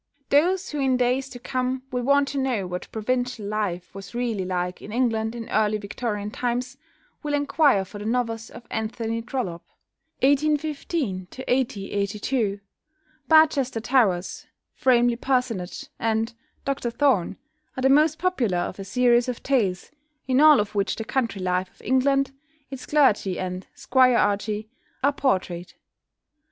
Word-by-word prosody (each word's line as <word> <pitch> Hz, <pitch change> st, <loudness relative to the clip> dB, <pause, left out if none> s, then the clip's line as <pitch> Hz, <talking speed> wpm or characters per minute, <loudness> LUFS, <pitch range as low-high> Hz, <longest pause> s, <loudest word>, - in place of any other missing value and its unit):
Those 350 Hz, +6 st, +2 dB
who 300 Hz, -, -3 dB
in 265 Hz, -2 st, +2 dB
days 255 Hz, +2 st, +1 dB
to 255 Hz, -, -9 dB
come 255 Hz, +1 st, -2 dB
will 250 Hz, -1 st, -1 dB
want 280 Hz, +2 st, +3 dB
to 280 Hz, -, -2 dB
know 250 Hz, -7 st, 0 dB
what 180 Hz, 0 st, -6 dB
provincial 245 Hz, 0 st, -2 dB
life 200 Hz, -4 st, -3 dB
was 195 Hz, +4 st, -10 dB
really 235 Hz, -5 st, -1 dB
like 180 Hz, 0 st, -2 dB
in 210 Hz, -, -9 dB
England 225 Hz, -2 st, 0 dB
in 230 Hz, -1 st, -6 dB
early 215 Hz, 0 st, +2 dB
Victorian 210 Hz, 0 st, -4 dB
times 245 Hz, +2 st, -2 dB, 0.5 s
will 295 Hz, -1 st, -1 dB
enquire 285 Hz, -8 st, +3 dB
for 205 Hz, +2 st, -10 dB
the 205 Hz, -, -7 dB
novels 230 Hz, -1 st, -1 dB
of 240 Hz, -, -12 dB
=Anthony 225 Hz, +1 st, -2 dB
Trollope 225 Hz, -8 st, -4 dB, 0.6 s
(1815 285 Hz, -, 0 dB
1822)=. 210 Hz, -3 st, -1 dB, 0.7 s
"Barchester 290 Hz, -5 st, +4 dB
Towers," 220 Hz, -7 st, +1 dB, 0.3 s
"Framley 240 Hz, -2 st, +3 dB
Parsonage," 250 Hz, -8 st, -1 dB
and 225 Hz, +1 st, 0 dB, 0.3 s
"Dr 275 Hz, -3 st, -1 dB
Thorne," 235 Hz, -6 st, +1 dB, 0.4 s
are -, -, -2 dB
the 265 Hz, -, +4 dB
most 305 Hz, +3 st, +4 dB
popular 265 Hz, -, 0 dB
of 180 Hz, +2 st, -3 dB
a -, -, -4 dB
series 240 Hz, +4 st, +3 dB
of 245 Hz, -, -5 dB
tales, 210 Hz, -, 0 dB, 0.4 s
in 260 Hz, +1 st, +3 dB
all 305 Hz, -1 st, +8 dB
of 205 Hz, 0 st, -2 dB
which 200 Hz, -1 st, 0 dB
the 225 Hz, -, -5 dB
country 225 Hz, -7 st, -1 dB
life 185 Hz, 0 st, 0 dB
of -, -, -23 dB
England, 275 Hz, +1 st, +2 dB, 0.4 s
its 265 Hz, -2 st, -7 dB
clergy 215 Hz, -11 st, +3 dB
and 185 Hz, 0 st, -4 dB
squirearchy, 215 Hz, -4 st, +2 dB, 0.4 s
are 280 Hz, +1 st, +4 dB
portrayed. 185 Hz, -10 st, -1 dB
240 Hz, 145 wpm, -24 LUFS, 205-265 Hz, 0.7 s, all